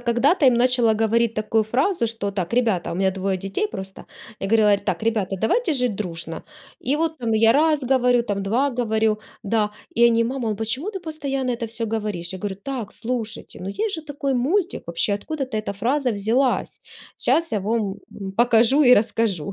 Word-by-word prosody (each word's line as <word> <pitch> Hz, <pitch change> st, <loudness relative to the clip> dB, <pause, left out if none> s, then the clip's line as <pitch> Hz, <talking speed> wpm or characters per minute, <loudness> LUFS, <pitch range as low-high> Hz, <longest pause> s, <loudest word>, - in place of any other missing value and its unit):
когда-то 265 Hz, +7 st, +2 dB
им 250 Hz, -, +6 dB
начала 240 Hz, -2 st, +3 dB
говорить 225 Hz, +1 st, +1 dB
такую 215 Hz, 0 st, +1 dB
фразу 260 Hz, -, +1 dB
что: 220 Hz, -3 st, -3 dB
"Так, 190 Hz, -2 st, -4 dB
ребята", 210 Hz, -9 st, +1 dB
у -, -, -4 dB
меня 190 Hz, +1 st, +2 dB
двое 190 Hz, 0 st, -2 dB
детей 195 Hz, -, -2 dB
просто. 190 Hz, -, -7 dB, 0.4 s
Я 195 Hz, -, -2 dB
говорила: 210 Hz, -2 st, +4 dB
"Так, 200 Hz, -, -3 dB
ребята, 215 Hz, -4 st, 0 dB
давайте 335 Hz, -, +1 dB
жить 250 Hz, -5 st, +1 dB
дружно". 165 Hz, -4 st, -4 dB, 0.5 s
И 290 Hz, -, +3 dB
вот, 320 Hz, 0 st, -1 dB
там 230 Hz, -2 st, -1 dB
я 225 Hz, +1 st, +5 dB
раз 300 Hz, +1 st, +3 dB
говорю, 250 Hz, -2 st, +3 dB
там, 205 Hz, -4 st, -3 dB
2 250 Hz, +8 st, +1 dB
говорю, 220 Hz, -3 st, 0 dB, 0.2 s
да, 210 Hz, 0 st, 0 dB, 0.3 s
и 235 Hz, -, +7 dB
они: 230 Hz, 0 st, +2 dB
"Мама, 245 Hz, -2 st, -2 dB
а 210 Hz, -, -1 dB
почему 225 Hz, -, -2 dB
ты 385 Hz, -, -6 dB
постоянно 280 Hz, -6 st, -3 dB
это 240 Hz, -1 st, -3 dB
всё 230 Hz, +1 st, -4 dB
говоришь?" 200 Hz, -5 st, -3 dB
Я 190 Hz, -, -6 dB
говорю: 195 Hz, -1 st, -4 dB
"Так, 250 Hz, -7 st, -4 dB
слушайте, 230 Hz, -2 st, -4 dB
ну 190 Hz, -, -4 dB
есть 420 Hz, -, -2 dB
же 320 Hz, -, -5 dB
такой 280 Hz, -2 st, -2 dB
мультик, 345 Hz, +10 st, 0 dB
вообще 170 Hz, +4 st, 0 dB
откуда-то 260 Hz, +2 st, -4 dB
эта 215 Hz, -1 st, -2 dB
фраза 250 Hz, +6 st, 0 dB
взялась. 230 Hz, +6 st, 0 dB, 0.4 s
Щас 330 Hz, -5 st, +2 dB
я 215 Hz, -, +1 dB
вам 210 Hz, -1 st, -1 dB, 0.4 s
покажу 240 Hz, +4 st, +4 dB
и 250 Hz, -, +8 dB
расскажу". 205 Hz, -6 st, 0 dB
230 Hz, 190 wpm, -22 LUFS, 210-265 Hz, 0.5 s, и